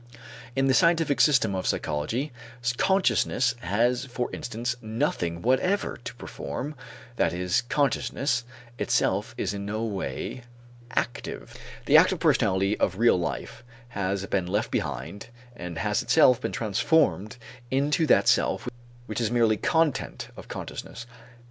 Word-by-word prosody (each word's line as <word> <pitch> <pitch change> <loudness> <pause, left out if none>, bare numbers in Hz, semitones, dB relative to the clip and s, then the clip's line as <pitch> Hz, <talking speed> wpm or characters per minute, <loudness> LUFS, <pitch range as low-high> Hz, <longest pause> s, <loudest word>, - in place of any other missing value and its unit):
In 135 0 +2
the 135 - +3
scientific 165 -2 +3
system 130 -9 +4
of 95 - -2
psychology, 110 - -1 0.5
consciousness 190 -10 +2
has 120 +4 +1
for 125 -2 -4
instance 120 +1 -3
nothing 90 -6 -2
whatever 155 - +1
to 120 - -8
perform, 130 - -6 0.4
that - - +2
is, 90 0 +1
consciousness 140 -3 0 0.4
itself - - 0
is 95 - -1
in 100 0 -5
no 110 +2 -2
way 105 +4 -4 0.5
active. - - -3 0.3
The - - +7
active - - +5
personality 100 +2 +2
of 95 - +1
real 115 -4 +4
life 85 - -4 0.3
has 100 -3 -2
been 95 -3 -1
left 105 +6 -1
behind 75 +7 -4 0.3
and 90 -5 -7
has 80 - 0
itself 125 -1 +5
been - - -2
transformed 115 - +1 0.3
into 145 +5 +1
that - - +4
self - - +2 0.4
which 120 - -3
is 115 - +1
merely 115 -2 +3
content 160 -4 0
of - - -11
consciousness. 120 - -7
115 Hz, 130 wpm, -26 LUFS, 95-135 Hz, 0.5 s, The